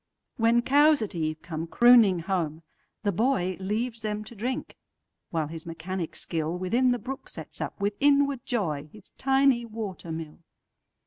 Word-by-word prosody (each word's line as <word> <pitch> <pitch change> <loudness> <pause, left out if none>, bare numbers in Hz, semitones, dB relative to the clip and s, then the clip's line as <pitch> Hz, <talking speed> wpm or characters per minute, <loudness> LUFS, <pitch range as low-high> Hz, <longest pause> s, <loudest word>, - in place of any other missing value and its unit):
When 235 0 +3
cows 290 0 +5
at 205 - -5
eve 155 -2 -3
come 165 -1 -4
crooning 225 -4 +6
home, 165 -3 -2 0.4
the 205 - +2
boyLeaves 215 +2 -1
them 215 -1 -3
to 225 - -11
drink, 250 +6 -3 0.5
while 160 -2 -1
his 160 +2 -8
mechanic 170 +1 -4
skillWithin 180 +10 0
the 245 - +1
brook 265 +4 -7
sets - - -8
up, - - -4
with 200 +1 0
inward 280 -2 +3
joy, 155 - -2
His 210 -2 -16
tiny 270 -2 +3
water 215 -7 -6
mill. 160 0 -6
205 Hz, 145 wpm, -27 LUFS, 170-245 Hz, 0.5 s, crooning